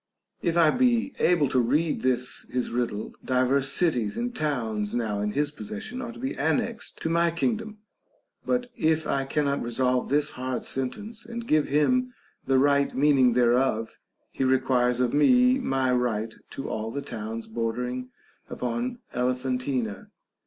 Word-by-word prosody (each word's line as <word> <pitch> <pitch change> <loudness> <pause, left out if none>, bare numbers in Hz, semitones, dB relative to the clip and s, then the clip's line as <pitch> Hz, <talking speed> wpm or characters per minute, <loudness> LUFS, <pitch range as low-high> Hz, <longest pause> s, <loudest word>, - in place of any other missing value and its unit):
If 170 -1 0
I 160 -3 +6
be 250 +1 +2
able 170 -5 +3
to 130 - +2
read 150 +7 +1
this 125 -1 0
his 125 -1 -2
riddle, 115 -3 -2
divers 130 +2 +2
cities 125 - +1
and 245 +1 -3
towns 115 - -1
now 110 -4 -1
in 105 0 -1
his 145 0 0
possession 220 +8 -6
are 235 -2 -5
to 240 - -12
be 265 +3 -3
annexed 160 +10 -1
to - - 0
my 170 0 +3
kingdom; 220 +5 -2 0.7
but 245 -1 -1
if 160 0 +1
I 135 -2 0
cannot 140 0 0
resolve 125 +1 0
this 145 +2 +1
hard 130 0 -4
sentence, 205 - -4
and 235 0 -6
give 155 -7 +2
him 250 - +2 0.3
the 135 0 +4
right 140 +1 +3
meaning 135 -3 +4
thereof, 120 -1 +1 0.3
he - - -2
requires 130 -2 +2
of 125 -2 +1
me 250 - +5
my 135 - 0
right 115 -3 0 0.2
to 135 - -6
all 110 +1 -3
the 140 +5 -4
towns 110 0 -5
bordering 125 +3 -3 0.4
upon 240 - -3 0.2
Elephantina. 125 -3 -1
135 Hz, 150 wpm, -26 LUFS, 125-170 Hz, 0.7 s, I